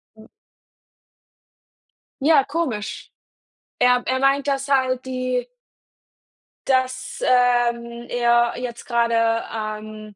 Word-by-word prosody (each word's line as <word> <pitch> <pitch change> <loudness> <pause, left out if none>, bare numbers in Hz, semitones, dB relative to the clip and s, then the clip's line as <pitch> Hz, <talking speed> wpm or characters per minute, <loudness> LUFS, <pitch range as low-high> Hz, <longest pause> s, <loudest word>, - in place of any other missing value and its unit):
Hm. 220 0 -17 1.9
Ja, 300 -1 +5
komisch. 265 -9 -4 0.7
Er 250 0 +4
er 260 0 0
meint, 275 +1 +2
dass 275 0 -1
halt 260 -2 +1
die 255 -1 -2 1.2
dass, 260 -1 -1
ähm, 240 -1 +1
er 240 0 +2
jetzt 245 -1 -6
gerade, 230 -1 +1
ähm 215 -1 -6
245 Hz, 90 wpm, -22 LUFS, 235-260 Hz, 1.9 s, Ja